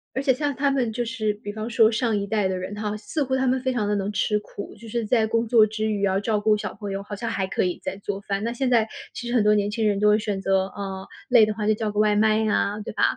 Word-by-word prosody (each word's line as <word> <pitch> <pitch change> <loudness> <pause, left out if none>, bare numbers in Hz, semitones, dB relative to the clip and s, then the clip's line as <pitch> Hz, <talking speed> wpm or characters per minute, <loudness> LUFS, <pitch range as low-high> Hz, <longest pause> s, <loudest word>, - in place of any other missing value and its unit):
而 265 - 0
且 275 - +3
像 285 +2 -2
他 280 +1 +1
们 260 -4 0
就 240 +2 -1
是 220 -3 -1
比 205 0 -7
方 215 +1 -5
说 225 -1 +4
上 230 -1 0
一 200 -1 -2
代 210 -1 +1
的 190 - -2
人 185 +2 -5
哈， 210 0 -3
似 285 +8 -2
乎 260 -1 -1
他 265 0 +1
们 260 +1 +2
非 260 0 -1
常 215 -4 -1
地 210 - +1
能 200 +1 -2
吃 210 0 +1
苦， 205 -1 -9
就 225 +2 -13
是 235 +1 -2
在 220 0 +2
工 230 +1 0
作 220 -2 +6
之 215 0 -2
余 205 -1 -2
要 195 -1 +2
照 210 +1 0
顾 215 +1 +3
小 210 - -4
朋 205 -2 -6
友， 195 0 -3
好 205 +1 -7
像 230 +3 -4
还 190 -3 -1
可 - - 0
以 180 -1 -2
再 - - -4
做 200 0 -5
饭。 200 0 -3
那 235 +1 -1
现 255 +1 -1
在 230 -3 +3 0.3
其 240 - -6
实 240 - -3
很 235 -4 +3
多 210 0 +4
年 205 -1 +1
轻 220 0 0
人 200 -1 +1
都 210 - +3
会 210 +1 +4
选 205 -2 -2
择 195 0 +1
呃， 195 -1 -6 0.2
累 240 -4 +7
的 215 - -1
话 210 0 -4
就 215 - +4
叫 215 0 -2
个 210 - -2
外 210 -1 +3
卖 215 +1 +3
呀， 210 -1 0
对 - - -6
吧？ - - 0
215 Hz, 335 characters per minute, -24 LUFS, 205-230 Hz, 0.3 s, 累